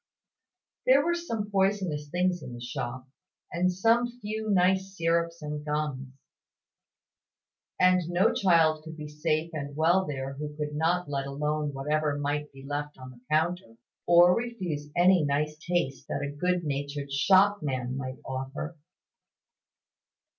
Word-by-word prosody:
There 275 +3 +6
were 345 - +2
some 230 -12 -3
poisonous 190 -7 0
things 180 +1 0
in 125 - -8
the - - -8
shop, 120 +1 -5 0.4
and 180 +2 +1
some 230 +6 +3
few 215 0 -4
nice 190 0 +2
syrups 165 0 0
and 150 0 -4
gums; 150 -3 -2 1.7
and 185 -2 +4
no 180 +4 +3
child 165 -5 +3
could 160 0 -9
be 150 -1 -6
safe 155 +2 -1
and 145 -2 -5
well 170 +4 +3
there 135 -2 -4
who 150 +1 -6
could 150 -1 -3
not 165 +3 +1
let 140 -1 -2
alone 150 +1 -1
whatever 150 +2 0
might 145 +1 -2
be 135 0 -13
left 145 +1 -4
on 130 -1 -10
the 120 -1 -17
counter, 155 -5 0 0.3
or 175 +1 +7
refuse 185 -12 -4
any 180 -1 +5
nice 150 +1 0
taste 145 -7 -2
that 140 - -3
a 145 0 -4
good 180 +3 0
natured 140 -1 -3
shopman 150 -5 +2
might 130 -1 -5
offer. 135 +5 -5
155 Hz, 140 wpm, -28 LUFS, 145-180 Hz, 1.7 s, or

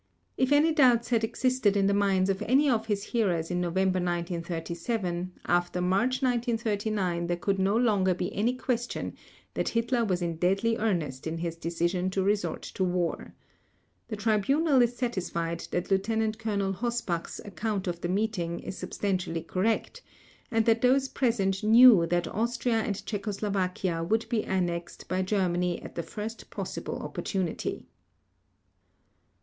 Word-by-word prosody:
If 260 +1 +1
any 300 +3 +5
doubts 245 -6 +4
had 230 -2 +2
existed 250 -3 +1
in 195 - +3
the 200 - +3
minds 195 -1 +2
of 195 +1 -4
any 275 +5 +4
of 225 -4 +1
his 205 -2 -1
hearers 185 -9 0
in 180 0 0
November 185 +2 +1
1937, 175 +2 -3
after 175 0 +1
March 200 +9 +1
1939 220 -7 0
there 175 0 0
could 195 +2 -1
no 195 +3 +2
longer 200 -6 +2
be 180 0 -3
any 230 +5 +1
question 245 -2 -2 0.4
that - - -1
Hitler 235 +1 +1
was 185 -5 0
in 170 -1 -2
deadly 195 +7 +2
earnest 165 -11 -1
in 160 +1 -3
his 165 0 -3
decision 170 +2 -1
to 190 0 0
resort 205 +1 0
to 190 - -3
war. 180 -2 -2 0.7
The 220 - -4
Tribunal 250 +8 +2
is 240 0 +1
satisfied 170 -8 -2
that 180 +2 -3
Lieutenant 220 +3 +1
Colonel 200 -3 -1
Hossbach's 230 -6 -3
account 200 +1 -3
of 175 -2 -3
the 175 - -2
meeting 185 -4 -1
is - - -7
substantially 185 -3 -2
correct, 220 - -1 0.5
and 225 -2 +1
that 230 0 +3
those 265 +2 +3
present 200 -7 0
knew 220 -5 +8
that 175 0 0
Austria 235 +1 0
and 205 -1 -3
Czechoslovakia 195 -4 -2
would 220 +6 0
be 225 -3 0
annexed 175 -2 -2
by 185 0 0
Germany 180 -3 0
at - - -9
the 170 - -3
first 215 +5 -7
possible - - -5
opportunity. 185 -5 -3
195 Hz, 150 wpm, -28 LUFS, 180-230 Hz, 0.7 s, knew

